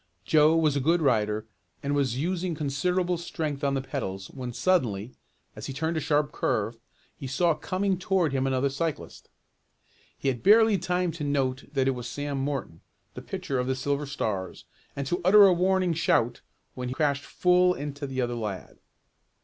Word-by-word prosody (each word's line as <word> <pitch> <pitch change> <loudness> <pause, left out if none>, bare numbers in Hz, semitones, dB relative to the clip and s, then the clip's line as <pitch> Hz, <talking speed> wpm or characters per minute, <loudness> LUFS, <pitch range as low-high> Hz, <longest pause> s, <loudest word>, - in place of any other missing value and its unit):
Joe 155 +1 +5
was 155 -3 +2
a - - +2
good 165 +6 +2
rider 110 -7 +1 0.4
and 140 +1 -1
was 135 -4 0
using 175 +3 -1
considerable 175 +5 0
strength 155 -4 -4
on 140 -1 +1
the 135 - -2
pedals 95 -9 -5
when 125 -2 -6
suddenly, 120 - 0 0.4
as - - -7
he 135 - -5
turned 160 +4 -2
a - - +1
sharp 145 0 +1
curve, 110 +2 -1 0.4
he 135 - -7
saw 165 +6 +2
coming 185 +4 -1
toward 180 -5 +1
him 135 0 +1
another 135 +1 +1
cyclist. 155 +1 -4 0.9
He 135 - 0
had 125 -3 -3
barely 215 0 +5
time 180 0 0
to 160 -2 -6
note 135 -2 -1
that 135 -2 +1
it - - +4
was 125 -2 -5
Sam 145 +3 -3
Morton, 135 - -3 0.3
the - - -8
pitcher 135 -2 -3
of 125 - -1
the 130 - 0
Silver 140 +2 -2
Stars, 105 -9 -4 0.3
and 140 - -3
to 175 +6 -1
utter 200 +3 +8
a 190 - +6
warning 185 0 +2
shout 120 -7 +1 0.3
when 125 -1 -5
he 125 - -4
crashed 145 -2 +1
full 180 0 +3
into 145 0 -5
the 130 -1 -2
other 120 -1 -1
lad. 105 -5 -5
145 Hz, 180 wpm, -27 LUFS, 130-170 Hz, 0.9 s, utter